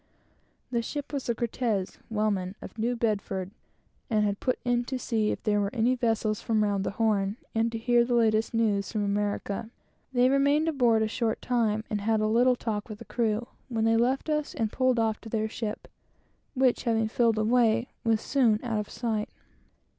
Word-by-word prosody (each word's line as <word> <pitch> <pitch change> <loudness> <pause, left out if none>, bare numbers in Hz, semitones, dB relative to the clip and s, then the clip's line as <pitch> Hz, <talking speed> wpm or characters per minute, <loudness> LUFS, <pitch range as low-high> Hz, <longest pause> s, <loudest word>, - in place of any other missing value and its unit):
The 235 -1 +1
ship 290 +5 -5
was 275 -2 -2
the 235 - 0
Cortes, 225 -4 -2
whaleman, 205 -4 -1
of - - -10
New 240 +3 0
Bedford, 200 -5 -2 0.6
and 215 -2 +2
had 205 -1 -1
put 255 - 0
in 245 0 +2
to 260 +1 -3
see 220 -4 0
if - - -3
there 210 -1 +2
were 200 - 0
any 240 +2 +3
vessels 225 -3 0
from 220 -2 +1
round 200 -2 0
the - - -1
Horn, 210 -2 +1 0.2
and 230 +1 +1
to 230 - -3
hear 240 +1 +3
the 240 0 0
latest 220 -1 +2
news 215 -4 +1
from 210 -3 -1
America. 205 +1 -2 0.4
They 250 -1 +4
remained 280 +4 +3
aboard 240 -8 +3
a - - +1
short 225 0 -1
time 220 -3 0
and 210 -1 -2
had 220 +1 +1
a 215 - +1
little 245 +4 +4
talk 220 -2 -4
with 215 - -6
the - - -11
crew, 230 -1 -1 0.2
when 225 -2 0
they 225 0 +4
left 250 +6 +1
us 300 -1 -1
and 220 -2 -1
pulled 255 -1 +2
off 220 -1 0
to 225 - -9
their 220 -1 0
ship, 220 -1 -5 0.7
which, 255 -1 +2
having 225 -2 +2
filled 230 0 +2
away, 230 +1 +2
was 225 -1 +2
soon 235 -6 +2
out 230 -3 -1
of 210 - -5
sight. 220 -3 -2
225 Hz, 195 wpm, -28 LUFS, 215-245 Hz, 0.7 s, They